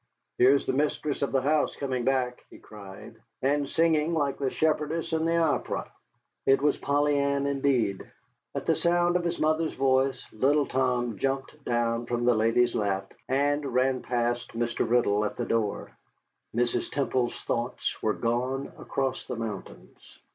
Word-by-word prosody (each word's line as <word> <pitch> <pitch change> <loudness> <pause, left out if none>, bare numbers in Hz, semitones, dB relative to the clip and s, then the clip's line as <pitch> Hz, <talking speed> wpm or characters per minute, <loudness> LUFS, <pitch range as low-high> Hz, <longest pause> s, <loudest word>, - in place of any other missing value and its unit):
"Here 130 +3 +7
is 140 - -1
the - - 0
mistress 145 +1 -1
of 140 - 0
the 135 -1 +1
house 150 +2 +1
coming 130 -3 -2
back," 130 -1 0
he - - -13
cried, 100 -2 -12 0.3
"and 140 +1 +1
singing 165 0 +2
like 145 -3 0
the 135 -2 0
shepherdess 155 +3 0
in 160 0 +1
the 165 0 +2
opera." 160 -4 0 0.6
It 135 - +5
was 145 +1 +2
Polly 145 0 +1
Ann 140 0 +1
indeed. 135 -8 0 0.4
At - - -3
the - - +3
sound 175 0 +2
of 180 - +1
his 170 0 -1
mother's 155 +1 +1
voice, 135 0 +1
little 140 +6 +2
Tom 125 -5 0
jumped 135 +2 -2
down 120 0 0
from 120 0 -1
the 125 - +5
lady's 115 +2 +2
lap 95 -2 -1 0.2
and 145 +2 +1
ran 130 -1 +1
past 120 -1 -1
Mr. 120 -1 -1
Riddle 110 -4 +3
at 105 - -3
the - - -2
door. 110 -3 -1 0.6
Mrs. 120 0 +1
Temple's 130 -3 -1
thoughts 120 +1 -2
were 110 - +1
gone 125 +4 -1
across 135 -1 -2
the - - -3
mountains. 115 -2 -8
135 Hz, 160 wpm, -27 LUFS, 120-145 Hz, 0.6 s, Here